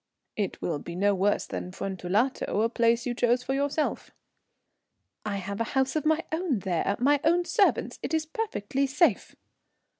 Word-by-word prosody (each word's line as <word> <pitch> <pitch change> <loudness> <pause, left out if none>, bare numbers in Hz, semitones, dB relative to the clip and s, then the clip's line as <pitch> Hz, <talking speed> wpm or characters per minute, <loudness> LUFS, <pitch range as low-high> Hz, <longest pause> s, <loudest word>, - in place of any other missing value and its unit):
"It 205 -3 -2
will 160 -4 -1
be 170 +4 -8
no 200 +3 +2
worse 200 +2 +1
than 180 - -5
Fuentellato, 195 +5 -1
a 230 - +2
place 235 0 +2
you 245 - -1
chose 245 +1 +2
for 265 - -2
yourself." 285 +2 -1 1.1
"I 210 -2 -2
have 200 +2 -4
a 230 - -2
house 265 +1 +2
of 310 -1 0
my 315 +1 +2
own 320 -5 0
there 190 0 -1
my 285 +3 +3
own 345 +2 +3
servants. 415 -2 +1
It - - -4
is 320 -1 +1
perfectly 280 - -2
safe." 295 +6 +1
240 Hz, 170 wpm, -27 LUFS, 200-295 Hz, 1.1 s, my